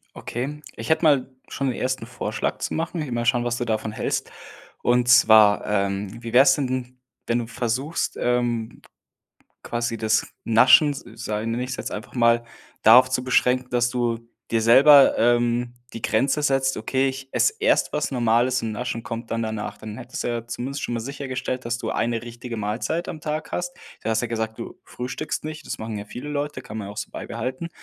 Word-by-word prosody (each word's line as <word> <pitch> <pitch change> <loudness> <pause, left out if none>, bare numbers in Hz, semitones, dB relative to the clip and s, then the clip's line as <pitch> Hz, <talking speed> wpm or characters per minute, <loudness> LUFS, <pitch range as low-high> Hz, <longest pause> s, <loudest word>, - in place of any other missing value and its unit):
Okay. 140 +5 -5 0.2
Ich 115 - -6
hätte 160 - +3
mal 140 -5 +4 0.2
schon 135 -1 -2
den 125 - -2
1. 130 -2 -2
Vorschlag 125 +2 -3
zu - - -3
machen. 165 +1 -2
Will 145 -5 -4
mal 120 0 -1
schauen, 120 0 +2
was 120 0 -1
du 120 - -1
davon 110 -1 -2
hältst. - - -2 0.5
Und 120 0 +2
zwar, 110 -4 +6
ähm, 100 +2 -2
wie 115 -1 -6
wäre 130 +2 +7
es 135 -1 +6
denn, 130 -2 -3 0.3
wenn 115 - +1
du 115 - -4
versuchst, 125 +7 -2
ähm, 120 -2 -1 0.8
quasi 120 -1 -2
das 110 -1 +1 0.2
Naschen, 130 +6 +6
sa - - -8
sag 110 -1 -3
nenne 115 +2 -1
ich 130 +1 -4
jetzt - - -5
einfach 105 - -7
mal, 115 -1 +4 0.4
darauf 125 +4 +8
zu 130 0 -1
beschränken, 125 0 +2
dass 120 0 +1
du 120 -2 -1 0.3
dir 115 -1 +1
selber, 135 +5 +7
ähm, 120 +1 +2 0.2
die 115 - -8
Grenze 135 +8 +1
setzt: 135 -2 +1
„Okay, 130 +5 0
ich 135 0 -7
esse 425 - +3
erst - - +2
was - - -1
Normales 120 +1 +2
und 115 - -3
Naschen 115 +1 -4
kommt 115 +1 -6
dann 115 - -1
danach“. 110 -1 -4
Dann 110 0 -8
hättest 125 0 -6
du - - -2
ja 120 -1 -3
zumindest 130 +4 -4
schon 120 - -2
mal 115 - -1
sichergestellt, 130 -1 -4
dass 120 0 -1
du 115 -2 -4
eine 115 +1 -1
richtige 120 0 -7
Mahlzeit 115 +11 -2
am 155 - -6
Tag 155 +1 -4
hast. 175 0 -3 0.3
Du - - -3
hast 110 0 +1
ja 120 - -2
gesagt, 110 -1 -3
du 115 - -8
frühstückst 130 +6 -5
nicht, 155 0 -7
das - - -5
machen 110 -1 -4
ja 100 - -6
viele 125 +8 -7
Leute, 145 -2 -3
kann 110 -3 -8
man 100 -2 -5
ja - - -7
auch - - -17
so - - -5
beibehalten, 130 +7 -5
120 Hz, 205 wpm, -23 LUFS, 115-130 Hz, 0.8 s, darauf